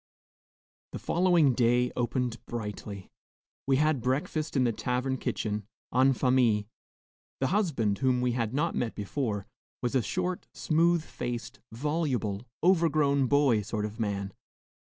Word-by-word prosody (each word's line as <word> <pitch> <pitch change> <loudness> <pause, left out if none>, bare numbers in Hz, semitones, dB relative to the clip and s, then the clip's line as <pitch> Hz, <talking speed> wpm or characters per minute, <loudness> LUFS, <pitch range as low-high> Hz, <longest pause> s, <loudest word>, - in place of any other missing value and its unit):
The - - -3
following 170 -6 +3
day 120 0 +2
opened 120 -1 -1
brightly. 105 -3 -6 0.6
We 135 - +4
had 150 -1 +2
breakfast 150 +4 -1
in 130 - +4
the 120 - +2
tavern 125 +3 -1
kitchen, 105 -4 -3 0.3
en 130 +2 +5
famille. 125 -5 +3 0.8
The 135 - +1
husband, 130 - +1
whom 130 -2 +2
we 125 0 +1
had 115 -3 -1
not 150 +6 0
met 120 -2 -2
before, 105 -1 -2 0.4
was 120 - 0
a 130 - +3
short, 180 +7 -2
smooth 170 +1 +2
faced, 120 -6 -5
voluble, 125 -5 -1 0.2
overgrown 155 -6 +3
boy 135 -5 +3
sort 105 0 -3
of 105 +2 -7
man. 100 -3 -2
125 Hz, 135 wpm, -29 LUFS, 115-150 Hz, 0.8 s, en